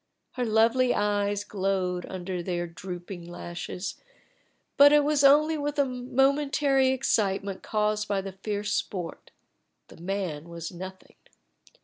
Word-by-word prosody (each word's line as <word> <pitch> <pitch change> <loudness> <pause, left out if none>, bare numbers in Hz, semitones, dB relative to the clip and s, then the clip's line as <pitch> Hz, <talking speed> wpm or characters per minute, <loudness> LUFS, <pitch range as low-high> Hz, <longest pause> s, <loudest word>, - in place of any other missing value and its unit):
Her 250 -1 -2
lovely 230 +3 +3
eyes 205 0 0
glowed 190 -3 -1
under 185 -1 -4
their 175 -1 -2
drooping 175 +1 -8
lashes, 175 +2 -6 0.7
but 285 +1 +8
it 295 0 +6
was 295 -1 +2
only 305 +3 +5
with 290 +1 -2
a 285 - +4
momentary 270 +2 +2
excitement 200 -6 0
caused 215 -1 0
by 200 -1 0
the 195 0 -6
fierce 205 +2 -3
sport; 180 -4 -4 0.6
the - - -14
man 175 -3 -4
was 170 -1 -6
nothing. 185 +1 -10
205 Hz, 125 wpm, -27 LUFS, 180-260 Hz, 0.7 s, but